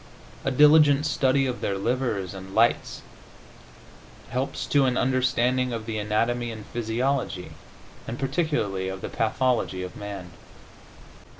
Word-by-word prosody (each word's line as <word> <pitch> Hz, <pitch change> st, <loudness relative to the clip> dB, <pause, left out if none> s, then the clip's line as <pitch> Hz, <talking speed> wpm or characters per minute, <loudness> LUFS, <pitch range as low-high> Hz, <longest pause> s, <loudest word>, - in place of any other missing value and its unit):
A -, -, +1 dB
diligent 150 Hz, +1 st, +6 dB
study 135 Hz, -2 st, +2 dB
of 125 Hz, -2 st, -3 dB
their 100 Hz, -, -1 dB
livers 110 Hz, -4 st, -1 dB
and 95 Hz, 0 st, -9 dB
lights 115 Hz, +2 st, +2 dB, 1.3 s
helps 135 Hz, +2 st, -2 dB
to 140 Hz, -2 st, +3 dB
an 125 Hz, -1 st, +1 dB
understanding 130 Hz, 0 st, +1 dB
of 115 Hz, -2 st, -4 dB
the 110 Hz, -1 st, -3 dB
anatomy 115 Hz, +3 st, 0 dB
and 110 Hz, -2 st, -8 dB
physiology, 120 Hz, -4 st, -2 dB, 0.6 s
and 115 Hz, -, -4 dB
particularly 135 Hz, -, -1 dB
of 95 Hz, 0 st, -6 dB
the -, -, -5 dB
pathology, 115 Hz, -4 st, 0 dB
of 90 Hz, -, -7 dB
man. 100 Hz, -4 st, -7 dB
120 Hz, 125 wpm, -25 LUFS, 105-130 Hz, 1.3 s, diligent